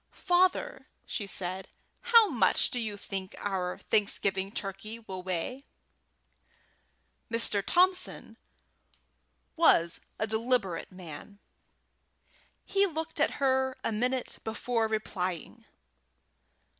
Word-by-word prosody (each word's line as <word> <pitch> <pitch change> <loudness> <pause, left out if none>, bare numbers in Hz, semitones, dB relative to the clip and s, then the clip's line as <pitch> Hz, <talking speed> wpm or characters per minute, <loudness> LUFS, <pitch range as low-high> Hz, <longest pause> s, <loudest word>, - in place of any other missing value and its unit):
"Father," 370 +7 +1 0.2
said 190 -3 -3
she, - - -30 0.3
"how 460 -2 +8
much 225 -8 +3
do 250 - -1
you 215 -3 -3
think 195 -1 -6
our 185 -3 -2
Thanksgiving 195 -2 +1
turkey 210 +3 -5
will 190 -5 -7
weigh?" 185 - -3 1.6
Mr. 230 -3 +1
Thompson 365 - +1 1.2
was 170 - +4 0.2
a 215 - 0
deliberate 220 -4 0
man. 185 +2 -10 1.3
He 400 0 +3
looked 320 -2 -4
at 310 - +3
her 265 -1 +1
a - - 0
minute 250 +4 0
before 225 +1 0
replying. 185 -6 -3
220 Hz, 95 wpm, -30 LUFS, 190-265 Hz, 1.6 s, how